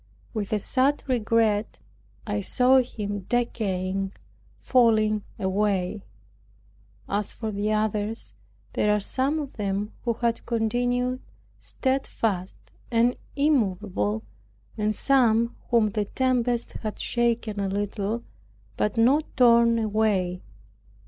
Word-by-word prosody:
With 210 Hz, -3 st, -3 dB
a 215 Hz, -, +2 dB
sad 265 Hz, +7 st, +1 dB
regret 225 Hz, -3 st, +1 dB, 0.5 s
I 205 Hz, -1 st, -1 dB
saw 250 Hz, +6 st, +4 dB
him 205 Hz, -6 st, -4 dB
decaying, 195 Hz, -5 st, -1 dB, 0.5 s
falling 220 Hz, -4 st, +3 dB, 0.2 s
away. 195 Hz, 0 st, -1 dB, 1.0 s
As 205 Hz, 0 st, -2 dB
for 220 Hz, -2 st, -5 dB
the 205 Hz, +1 st, -1 dB
others 215 Hz, +1 st, -1 dB, 0.4 s
there 210 Hz, 0 st, +2 dB
are -, -, +1 dB
some 265 Hz, +8 st, 0 dB
of 290 Hz, -3 st, -5 dB
them 205 Hz, 0 st, -2 dB
who 235 Hz, -, +1 dB
have 235 Hz, 0 st, -1 dB
continued 245 Hz, +2 st, 0 dB, 0.4 s
stedfast 225 Hz, -8 st, -2 dB, 0.3 s
and 240 Hz, +1 st, +3 dB, 0.2 s
immovable, 195 Hz, -, 0 dB, 0.5 s
and 215 Hz, -1 st, 0 dB
some 235 Hz, -4 st, +3 dB
whom 230 Hz, -3 st, +4 dB
the 210 Hz, 0 st, -1 dB
tempest 245 Hz, 0 st, 0 dB
has 215 Hz, -2 st, -5 dB
shaken 235 Hz, -3 st, 0 dB
a 195 Hz, -1 st, -1 dB
little, 205 Hz, +3 st, -2 dB, 0.5 s
but 210 Hz, +1 st, 0 dB
not 270 Hz, +7 st, +4 dB
torn 235 Hz, -2 st, +5 dB
away. 210 Hz, -5 st, 0 dB
220 Hz, 110 wpm, -25 LUFS, 205-240 Hz, 1.0 s, torn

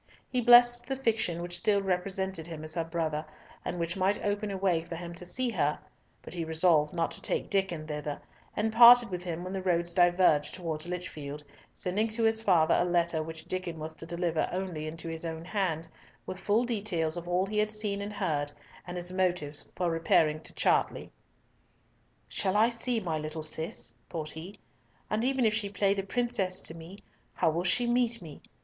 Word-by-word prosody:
He 250 Hz, -, +1 dB
blessed 240 Hz, 0 st, +7 dB
the 270 Hz, -, -1 dB
fiction 220 Hz, -9 st, 0 dB
which 175 Hz, 0 st, -4 dB
still 200 Hz, +2 st, +3 dB
represented 190 Hz, -2 st, -2 dB
him 160 Hz, -2 st, -7 dB
as 155 Hz, 0 st, -4 dB
her 165 Hz, 0 st, 0 dB
brother, 160 Hz, -2 st, -2 dB, 0.4 s
and 180 Hz, -, -3 dB
which 170 Hz, 0 st, -2 dB
must 195 Hz, +2 st, +1 dB
open 205 Hz, +1 st, -1 dB
a 195 Hz, -, -3 dB
way 185 Hz, -4 st, +2 dB
for 170 Hz, -, -7 dB
him 170 Hz, 0 st, -7 dB
to 175 Hz, +1 st, -7 dB
see 250 Hz, +5 st, 0 dB
her, 150 Hz, -7 st, +1 dB, 0.5 s
but -, -, -9 dB
he 170 Hz, -2 st, -3 dB
resolved 160 Hz, -2 st, +3 dB
not 170 Hz, -1 st, -1 dB
to -, -, -8 dB
take -, -, -2 dB
Diccon 190 Hz, -6 st, 0 dB
thither, 150 Hz, -1 st, -4 dB, 0.4 s
and 220 Hz, +1 st, 0 dB
parted 240 Hz, -1 st, +9 dB
with 180 Hz, -1 st, -4 dB
him 175 Hz, -1 st, -4 dB
when 185 Hz, +1 st, -5 dB
the 190 Hz, -, -2 dB
roads 170 Hz, -2 st, +1 dB
diverged 175 Hz, -4 st, +4 dB
towards 165 Hz, -3 st, -4 dB
Lichfield, 150 Hz, -5 st, -6 dB, 0.3 s
sending 205 Hz, +5 st, 0 dB
to 225 Hz, +1 st, -2 dB
his 225 Hz, 0 st, +3 dB
father 170 Hz, -6 st, +4 dB
a -, -, +4 dB
letter 170 Hz, -2 st, +1 dB
which 160 Hz, +1 st, -7 dB
Diccon 180 Hz, -2 st, -4 dB
was 155 Hz, +1 st, -5 dB
to 165 Hz, -, -9 dB
deliver 170 Hz, -1 st, -1 dB
only 180 Hz, -4 st, -3 dB
into 165 Hz, +1 st, -6 dB
his 165 Hz, 0 st, -4 dB
own 165 Hz, 0 st, -5 dB
hand, 180 Hz, -5 st, -1 dB, 0.4 s
with 185 Hz, -, -6 dB
full 210 Hz, +4 st, +2 dB
details 200 Hz, -9 st, -1 dB
of 175 Hz, 0 st, -6 dB
all 180 Hz, +2 st, +2 dB
he 210 Hz, +2 st, -1 dB
had 210 Hz, 0 st, +2 dB
seen 210 Hz, -2 st, -2 dB
and 205 Hz, +1 st, -5 dB
heard, 145 Hz, -6 st, -1 dB, 0.4 s
and 175 Hz, 0 st, -5 dB
his 175 Hz, 0 st, -4 dB
motives 180 Hz, -6 st, -1 dB
for 175 Hz, -2 st, 0 dB
repairing 165 Hz, -2 st, +3 dB
to -, -, -11 dB
Chartley. -, -, +1 dB, 1.2 s
"Shall 195 Hz, +1 st, 0 dB
I 225 Hz, +2 st, +5 dB
see 235 Hz, 0 st, -1 dB
my 165 Hz, -6 st, -2 dB
little 155 Hz, +1 st, -5 dB
Cis?" 155 Hz, -5 st, -4 dB, 0.2 s
thought 155 Hz, -3 st, -4 dB
he. 170 Hz, +6 st, -8 dB, 0.6 s
"And 215 Hz, +2 st, +1 dB
even 260 Hz, -1 st, +2 dB
if 215 Hz, -, +3 dB
she 215 Hz, -2 st, -1 dB
play 200 Hz, 0 st, +2 dB
the 200 Hz, -, -1 dB
princess 195 Hz, -2 st, -1 dB
to -, -, -4 dB
me, 165 Hz, +4 st, -10 dB, 0.4 s
how 160 Hz, -, +2 dB
will 170 Hz, +3 st, -1 dB
she 190 Hz, +7 st, +2 dB
meet 240 Hz, -1 st, +2 dB
me? 155 Hz, -5 st, -11 dB
180 Hz, 200 wpm, -30 LUFS, 165-205 Hz, 1.2 s, parted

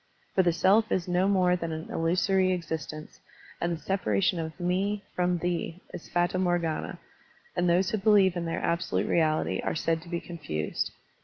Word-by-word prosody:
For 190 Hz, -, +4 dB
the 175 Hz, -2 st, +3 dB
self 200 Hz, +6 st, +3 dB
is 180 Hz, -1 st, 0 dB
no 180 Hz, +2 st, +2 dB
more 185 Hz, -3 st, +3 dB
than 165 Hz, -2 st, -4 dB
an 160 Hz, 0 st, -6 dB
illusory 185 Hz, +3 st, +2 dB
existence, 155 Hz, -3 st, -5 dB, 0.4 s
and 170 Hz, -, 0 dB
the 165 Hz, -, -3 dB
separation 165 Hz, -, 0 dB
of 160 Hz, +1 st, -5 dB
"me" 195 Hz, +4 st, 0 dB
from 180 Hz, 0 st, +1 dB
"thee" 175 Hz, 0 st, -2 dB
is -, -, -8 dB
fata 175 Hz, +1 st, +1 dB
morgana, 175 Hz, -3 st, -1 dB, 0.6 s
and 175 Hz, 0 st, +2 dB
those 185 Hz, +5 st, +3 dB
who 220 Hz, -, 0 dB
believe 195 Hz, -3 st, +4 dB
in 175 Hz, -1 st, -2 dB
their 165 Hz, -, -2 dB
absolute 170 Hz, -, 0 dB
reality 155 Hz, -2 st, +1 dB
are -, -, -1 dB
said 165 Hz, 0 st, 0 dB
to 170 Hz, -, -13 dB
be 170 Hz, -1 st, -2 dB
confused. 145 Hz, -, -3 dB
175 Hz, 175 wpm, -28 LUFS, 165-185 Hz, 0.6 s, For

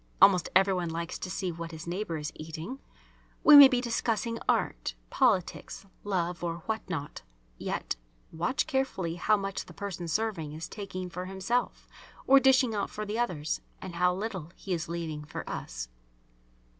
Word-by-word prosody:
(Almost 185 Hz, -4 st, +6 dB
every 195 Hz, +1 st, +5 dB
one 175 Hz, -2 st, -1 dB
likes 170 Hz, +1 st, -4 dB
to 185 Hz, -, -5 dB
see 185 Hz, 0 st, -2 dB
what 165 Hz, 0 st, -6 dB
his 160 Hz, -1 st, -8 dB
neighbour 175 Hz, -1 st, -3 dB
is 150 Hz, 0 st, -4 dB
eating.) 160 Hz, -, -7 dB, 0.6 s
We 300 Hz, -, +10 dB
may 285 Hz, -1 st, +13 dB
be 255 Hz, -2 st, +1 dB
discussing 230 Hz, -1 st, -1 dB
art, -, -, 0 dB, 0.2 s
politics, 205 Hz, -7 st, +1 dB, 0.2 s
love, 180 Hz, -3 st, -1 dB
or 170 Hz, -1 st, -3 dB
what 220 Hz, 0 st, -1 dB
not, 150 Hz, -5 st, -4 dB, 0.4 s
yet -, -, -3 dB, 0.3 s
watch 175 Hz, +12 st, 0 dB
carefully 265 Hz, -11 st, -1 dB
how 215 Hz, +4 st, +3 dB
much 195 Hz, -1 st, -3 dB
the -, -, -13 dB
person 190 Hz, -4 st, -5 dB
serving 165 Hz, -4 st, -1 dB
is 160 Hz, +1 st, -6 dB
taking 185 Hz, -3 st, -6 dB
for 180 Hz, +1 st, -5 dB
himself 195 Hz, +6 st, -2 dB, 0.4 s
or 275 Hz, +1 st, +8 dB
dishing 260 Hz, -3 st, +4 dB
out 205 Hz, -, -1 dB
for 215 Hz, -, -5 dB
the 210 Hz, +3 st, -3 dB
others, 160 Hz, -10 st, -1 dB, 0.2 s
and 185 Hz, -2 st, -7 dB
how 180 Hz, +1 st, +3 dB
little 190 Hz, -5 st, -4 dB
he 190 Hz, -, -4 dB
is 165 Hz, -1 st, -3 dB
leaving 160 Hz, -3 st, -4 dB
for 150 Hz, -, -7 dB
us. -, -, -5 dB
185 Hz, 170 wpm, -29 LUFS, 165-220 Hz, 0.6 s, may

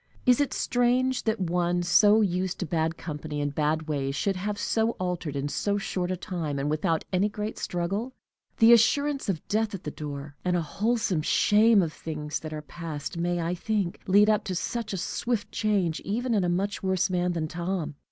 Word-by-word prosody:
Is 250 Hz, +2 st, +5 dB
it 285 Hz, -, 0 dB
strange 250 Hz, +1 st, +1 dB
that 220 Hz, -1 st, 0 dB
one 175 Hz, 0 st, 0 dB
so 210 Hz, +5 st, +5 dB
used 185 Hz, -2 st, 0 dB
to 180 Hz, -, -1 dB
bad 160 Hz, +1 st, -1 dB
company 150 Hz, -2 st, -5 dB
and 145 Hz, -1 st, -1 dB
bad 155 Hz, +2 st, 0 dB
ways 135 Hz, -2 st, -1 dB
should 195 Hz, +5 st, 0 dB
have 205 Hz, +3 st, -3 dB
so 225 Hz, +2 st, +1 dB
altered, 180 Hz, -5 st, -3 dB
in 140 Hz, +1 st, -1 dB
so 200 Hz, +7 st, -1 dB
short 185 Hz, -2 st, -2 dB
a 185 Hz, -, -1 dB
time, 165 Hz, -5 st, -3 dB
and 140 Hz, +2 st, -1 dB
without 155 Hz, +1 st, 0 dB
any 190 Hz, +3 st, +2 dB
great 210 Hz, +1 st, -5 dB
struggle? 195 Hz, +8 st, -2 dB, 0.5 s
The 230 Hz, +1 st, +8 dB
assurance 275 Hz, +3 st, +3 dB
of 170 Hz, -5 st, -3 dB
death 215 Hz, 0 st, 0 dB
at 190 Hz, -, -9 dB
the 150 Hz, -, -4 dB
door, 145 Hz, -1 st, -7 dB
and 180 Hz, -1 st, +1 dB
a -, -, +1 dB
wholesome 210 Hz, 0 st, 0 dB
shame 210 Hz, +5 st, +4 dB
of 160 Hz, -2 st, -3 dB
things 150 Hz, -1 st, -4 dB
that 155 Hz, -, -7 dB
are 155 Hz, -1 st, -5 dB
past, 155 Hz, 0 st, -6 dB
may, 175 Hz, 0 st, 0 dB
I 170 Hz, +1 st, -1 dB
think, 195 Hz, -1 st, -2 dB
lead 205 Hz, +2 st, +6 dB
up 215 Hz, -1 st, +3 dB
to 185 Hz, -, -3 dB
such 230 Hz, +4 st, -3 dB
a 195 Hz, -, -2 dB
swift 220 Hz, +4 st, -2 dB
change, 195 Hz, -7 st, 0 dB
even 235 Hz, +4 st, -2 dB
in 205 Hz, -4 st, +2 dB
a 175 Hz, -, +1 dB
much 195 Hz, +3 st, -1 dB
worse 190 Hz, -1 st, +1 dB
man 180 Hz, 0 st, +1 dB
than 160 Hz, -2 st, -2 dB
Tom. 170 Hz, -1 st, -3 dB
180 Hz, 200 wpm, -27 LUFS, 160-210 Hz, 0.5 s, The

